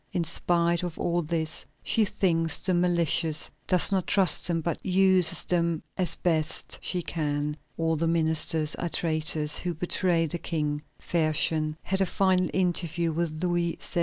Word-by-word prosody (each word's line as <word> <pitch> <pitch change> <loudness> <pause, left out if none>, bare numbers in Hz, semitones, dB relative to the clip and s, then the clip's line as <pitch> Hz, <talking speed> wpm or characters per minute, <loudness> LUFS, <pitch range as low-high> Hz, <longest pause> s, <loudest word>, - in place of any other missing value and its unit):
In 175 - -1
spite 170 +1 +1
of 175 -2 -5
all 175 0 0
this, 160 -1 -2 0.2
she 220 - +2
thinks 165 -5 +1
them 180 -2 0
malicious, 170 -3 +1 0.2
does 180 -1 +4
not 190 -2 0
trust 195 -3 +3
them, 170 -2 +2
but 170 +1 -4
uses 190 -2 +2
them 170 -2 0
as 185 -2 +1
best 160 -3 -1
she 180 -2 -2
can. 150 -2 -2 0.2
All 160 0 0
the 165 +2 -1
ministers 160 -1 +2
are 175 - -3
traitors 155 -2 +1
who 175 -2 -3
betray 175 0 +1
the 165 +2 -4
King." 150 -3 -2 0.2
Fersen 155 -1 0
had 190 +1 0
a 190 - +2
final 185 -2 +1
interview 170 -2 0
with 160 0 -3
Louis 175 -1 0
XVI. - - -4
170 Hz, 160 wpm, -26 LUFS, 160-180 Hz, 0.2 s, does